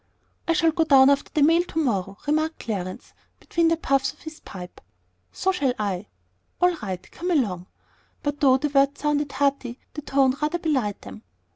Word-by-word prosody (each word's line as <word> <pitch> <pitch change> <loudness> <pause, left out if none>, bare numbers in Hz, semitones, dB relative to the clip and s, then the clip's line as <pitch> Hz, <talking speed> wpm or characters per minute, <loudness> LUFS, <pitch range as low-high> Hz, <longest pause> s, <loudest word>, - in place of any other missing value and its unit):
"I 335 - +3
shall 330 0 +3
go 325 +1 +2
down 275 -3 +6
after 280 - 0
the 300 - +2
mail 330 +3 +5
to 325 - -9
morrow," 200 - 0
remarked 310 +2 0
Clarence, 185 -5 -5 0.3
between 335 -1 +1
the 330 0 +2
puffs 275 -3 +1
of 300 - -25
his 315 -1 -9
pipe. 180 -3 -10 0.5
"So 380 - 0
shall 280 -9 0
I." 200 -2 -3 0.5
"All 360 0 +3
right; 190 -4 -5
come 355 +2 -4
along!" 200 - 0 0.6
But 290 0 -2
though 265 -3 +5
the 295 +3 -1
words 280 0 +2
sounded 295 -1 0
hearty, 265 -3 0 0.2
the 300 - -6
tone 270 -2 +2
rather 305 +3 0
belied 265 - -1
them. 215 - -10
280 Hz, 180 wpm, -24 LUFS, 235-315 Hz, 0.6 s, down